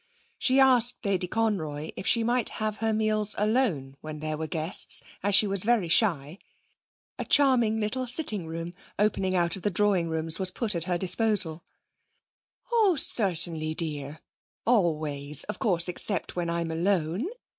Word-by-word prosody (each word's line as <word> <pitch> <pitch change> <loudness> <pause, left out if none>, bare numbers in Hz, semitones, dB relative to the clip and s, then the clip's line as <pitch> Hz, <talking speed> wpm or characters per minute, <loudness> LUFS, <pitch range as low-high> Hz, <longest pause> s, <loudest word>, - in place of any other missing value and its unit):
She 260 +1 +3
asked 250 -3 +4
Lady 190 -2 0
Conroy 165 -9 -3
if - - -6
she 230 -1 +3
might 240 +1 0
have 215 -1 -3
her 225 0 -1
meals 215 -1 -1
alone 205 - -1
when 155 -1 -8
there 155 0 -3
were 160 +1 -5
guests, 160 +3 +2 0.2
as 205 0 +1
she 215 - +6
was 195 -2 +1
very 225 -5 +1
shy. 165 -3 +2 0.8
A - - -4
charming 245 -6 +3
little 255 +4 -3
sitting 235 - +1
room, 165 +1 -6 0.2
opening 195 -2 0
out 175 0 0
of 190 - -10
the 205 - -1
drawing 190 -3 0
rooms, 160 +1 +1
was 190 -1 +2
put 215 +3 -3
at 170 -1 -3
her 180 -1 -1
disposal. 185 -3 +1 1.1
'Oh, 430 -6 +3
certainly, 170 - 0
dear; 150 -2 -3 0.4
always, 155 - +1
of 210 - -7
course, 175 -5 +3
except 180 +1 -2
when 175 -1 -3
I'm 170 -1 -2
alone. 175 - -1
190 Hz, 155 wpm, -26 LUFS, 160-220 Hz, 1.1 s, she